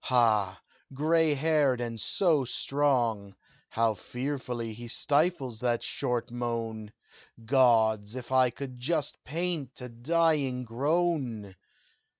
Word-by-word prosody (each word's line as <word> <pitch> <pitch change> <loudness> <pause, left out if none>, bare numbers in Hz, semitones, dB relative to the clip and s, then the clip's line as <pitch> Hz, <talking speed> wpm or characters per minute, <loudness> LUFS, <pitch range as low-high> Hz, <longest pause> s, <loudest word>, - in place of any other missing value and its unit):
Ha! 110 -7 +2 0.4
gray 155 +1 +2
haired, 145 -3 +2
and 115 -2 -4
so 160 - +2
strong! 120 -7 0 0.3
How 115 -1 +1
fearfully 125 -1 -4
he 120 +2 -9
stifles 140 -2 0
that 120 -1 0
short 120 -1 -2
moan! 115 -3 -4 0.5
Gods! 110 -4 +3
if 125 -1 -8
I 130 -1 +4
could 125 -1 -8
but 150 0 0
paint 160 -3 -3
a 125 -1 -7
dying 140 0 +1
groan! 130 - -1
125 Hz, 110 wpm, -29 LUFS, 115-145 Hz, 0.5 s, I